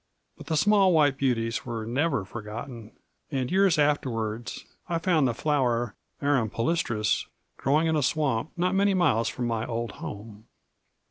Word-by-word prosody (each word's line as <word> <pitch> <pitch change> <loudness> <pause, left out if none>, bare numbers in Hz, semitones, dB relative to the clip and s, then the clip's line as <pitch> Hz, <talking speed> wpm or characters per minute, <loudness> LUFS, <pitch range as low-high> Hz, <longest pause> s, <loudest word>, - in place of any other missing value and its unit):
But - - -13
the 160 - 0
small 200 0 +4
white 145 -4 +4
beauties 115 -4 0
were 115 -3 -4
never 135 -2 0
forgotten, 115 +2 -8 0.4
and 130 -4 -2
years 190 -2 +4
afterwards 120 -6 -1 0.2
I 170 - +1
found 165 -4 +2
the 120 - 0
flower, 120 -7 0 0.3
arum 135 -6 +2
palustris, 115 -4 0 0.3
growing 150 +5 +2
in 160 -1 +1
a 150 - +2
swamp 140 -2 0
not 180 +2 +1
many 195 0 +3
miles 115 - +2
from 125 - -4
my 115 -2 -1
old 115 -1 -3
home. 105 +1 -9
130 Hz, 150 wpm, -27 LUFS, 115-155 Hz, 0.4 s, small